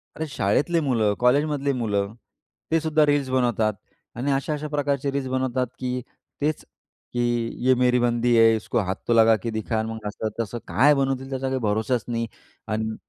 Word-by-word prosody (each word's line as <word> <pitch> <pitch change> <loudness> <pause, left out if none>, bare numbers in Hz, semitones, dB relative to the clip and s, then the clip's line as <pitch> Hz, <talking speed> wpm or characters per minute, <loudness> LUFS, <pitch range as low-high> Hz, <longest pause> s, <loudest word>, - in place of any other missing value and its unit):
अरे, 160 - -3
शाळेतले 140 - +1
मुलं 115 -8 +1
कॉलेजमधले 140 +3 +2
मुलं, 105 -4 -1 0.6
ते 165 - +4
सुद्धा 155 -1 +2
रील्स 145 -2 +1
बनवतात 120 -4 +1 0.4
आणि 135 +4 -1
अशा-अशा 150 +2 -1
प्रकारचे 140 -2 -1
रील्स 135 -1 -2
बनवतात 130 -1 -1 0.7
तेच 150 +1 0 0.5
की, 120 -1 0 0.2
ये 130 - +7
मेरी 125 0 +4
बंदी 120 0 +2
है, 115 0 +6
इसको 110 +2 -1
हाथ 95 -2 -1
तो 120 - +3
लगा 115 -1 +6
के 115 - -2
दिखा 110 0 -1
मग 110 -1 -5
असं 110 +1 -3
तसं 115 +1 -2
काय 145 +4 +5
बनवतील, 135 -1 -1
त्याचा 135 0 -2
काही 130 0 -1
भरोसाच 110 +2 0
नाही 115 -1 -2 0.4
अन् 110 0 -2
125 Hz, 165 wpm, -24 LUFS, 115-140 Hz, 0.7 s, ये